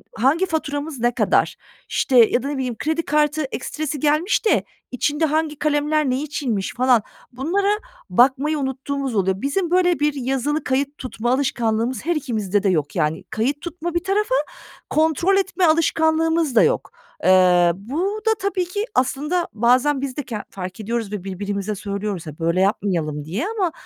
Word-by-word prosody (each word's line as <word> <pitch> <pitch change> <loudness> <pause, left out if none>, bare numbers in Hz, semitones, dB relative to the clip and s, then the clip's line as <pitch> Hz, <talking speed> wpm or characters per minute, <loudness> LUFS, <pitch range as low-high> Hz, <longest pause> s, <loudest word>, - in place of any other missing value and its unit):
hangi 275 - +2
faturamız 300 -4 -3
ne 240 +1 +1
kadar, - - +2 0.3
işte, 260 - +1
ya 240 +1 +5
da - - -3
ne 285 0 -3
bileyim, 255 -3 -2
kredi 320 +2 -1
kartı 300 +1 +1
ekstresi 295 +2 -4
gelmiş 305 - +1
de 435 - +3 0.3
içinde 295 +5 0
hangi 310 -1 -1
kalemler 300 -1 +1
ne 255 +2 0
içinmiş 255 -9 -2
falan 250 -1 +3 0.3
bunlara 335 +11 -1 0.4
bakmayı 275 +5 +3
unuttuğumuz 270 -1 -3
oluyor. 190 -1 0
Bizim 335 +6 -1
böyle 360 -2 +3
bir 295 0 +2
yazılı 270 +3 -1
kayıt 275 +2 -1
tutma 240 -2 -3
alışkanlığımız 240 -3 0
her 345 0 +1
ikimizde 215 -8 -1
de 200 - +3
yok 155 -6 0
yani. 155 +2 0
Kayıt 270 +7 -1
tutma 345 0 -5
bir 345 - 0
tarafa, 420 +6 +1 0.5
kontrol 320 +5 +2
etme 385 -2 +1
alışkanlığımız 320 -2 +2
da - - +7
yok. - - 0 0.3
Eee, 180 -2 +5
bu 335 - -3
da 445 - +5
tabii 380 -2 -1
ki 405 +4 -3
aslında 300 +7 0
bazen 255 +5 +3
biz 270 -2 -4
de 290 - -2
ken 220 -5 -5
fark 185 0 -7
ediyoruz 225 -1 -3
ve 205 -4 -4
birbirimize 200 +2 -3
söylüyoruz 200 -3 -4
ha 155 - -5
"Böyle 170 +3 +1
yapmayalım." 170 -7 0
diye 195 - -3
ama, 405 -6 -1
275 Hz, 165 wpm, -21 LUFS, 220-315 Hz, 0.5 s, da